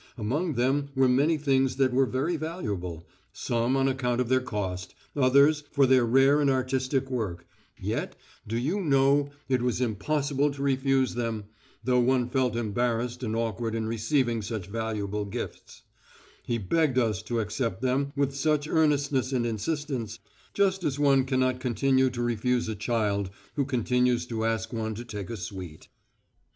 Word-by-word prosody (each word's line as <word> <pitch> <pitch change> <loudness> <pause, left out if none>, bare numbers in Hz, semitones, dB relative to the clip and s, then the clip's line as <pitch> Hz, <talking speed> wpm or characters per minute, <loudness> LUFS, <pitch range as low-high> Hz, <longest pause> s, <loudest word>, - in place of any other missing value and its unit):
Among 145 +10 -1
them 135 +3 +1
were 130 0 +4
many 140 +6 +3
things 135 -3 +1
that 130 -2 +2
were 135 +1 +3
very 140 +8 -1
valuable, 100 - -4 0.3
some 120 +2 0
on 135 0 +2
account 125 -2 0
of 125 -2 0
their 130 0 +3
cost, 100 -6 -4 0.2
others 140 +3 +4
for 140 -2 +3
their 130 -1 +5
rare 135 +4 +5
and 140 - +3
artistic 130 0 0
work, 95 -9 -3 0.3
yet, - - -3 0.3
do 115 +2 -2
you 155 +12 0
know, 140 -2 +3 0.2
it 130 -2 +1
was 125 -1 0
impossible 140 +5 0
to 140 0 -5
refuse 135 -1 +2
them, 115 -3 -2 0.4
though 125 -1 +3
one 125 0 +2
felt 125 -4 +1
embarrassed 120 +2 -1
and 110 -3 -2
awkward 115 0 -2
in 110 -1 -1
receiving 115 +1 0
such 105 -2 -4
valuable 105 -1 -3
gifts 100 - -7 0.6
he 120 - -2
begged 135 - +1
us 110 -6 +1
to 120 -1 -2
accept 110 0 -2
them 135 +2 +1
with 140 -1 0
such 150 +1 +1
earnestness 145 -5 +1
and 125 -3 0
insistence, 120 -1 -3 0.4
just 190 -2 +2
as 145 -4 -1
one 140 -2 +4
cannot 130 -1 +1
continue 130 +1 +2
to 120 -1 -3
refuse 120 +1 0
a 110 - -2
child 105 -2 -1 0.3
who 140 -2 +1
continues 125 -1 +1
to 115 -2 -3
ask 115 0 -1
one 110 -1 -2
to 120 +3 -7
take 105 -6 -6
a 115 - -4
sweet. 90 -5 -8
125 Hz, 165 wpm, -27 LUFS, 115-135 Hz, 0.6 s, their